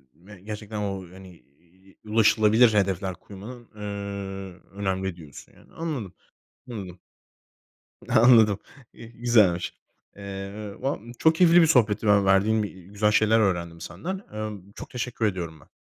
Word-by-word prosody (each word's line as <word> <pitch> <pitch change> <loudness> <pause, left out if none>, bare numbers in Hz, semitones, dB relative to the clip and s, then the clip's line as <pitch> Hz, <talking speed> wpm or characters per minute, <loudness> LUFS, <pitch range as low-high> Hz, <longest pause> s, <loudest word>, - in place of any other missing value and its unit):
ve 95 +4 -15
gerçekten, 105 +1 -7
o, 100 -2 -3
hani, 95 -1 -12 0.3
iii, 95 +3 -25
ulaşılabilir 110 +1 +4
hedefler 95 -2 0
koymanın, 110 +6 -11
eee, 105 - -11 0.9
önemli 95 -2 -2
diyorsun, 80 -5 -13
yani. - - -22
Anladım, 145 - -4 0.6
anladım. 95 -6 -7 1.1
Anladım, 110 -4 +6 0.4
güzelmiş. 115 -6 +1 0.4
Eee, 100 +1 -7
va 135 +2 -1 0.2
çok 160 0 +4
keyifli 175 +1 +6
bir - - +5
sohbetti. 115 -8 +3
Ben, 105 -1 +5
verdiğin, 100 +3 +3
iii, 95 -3 -8
güzel 105 +1 +1
şeyler 110 +1 +4
öğrendim 85 -5 -1
senden. 105 - -5
Emm, 105 -2 -6
çok - - -9
teşekkür 120 -2 -2
ediyorum 85 -6 -4
ben. 65 - -21
105 Hz, 130 wpm, -25 LUFS, 95-110 Hz, 1.1 s, Anladım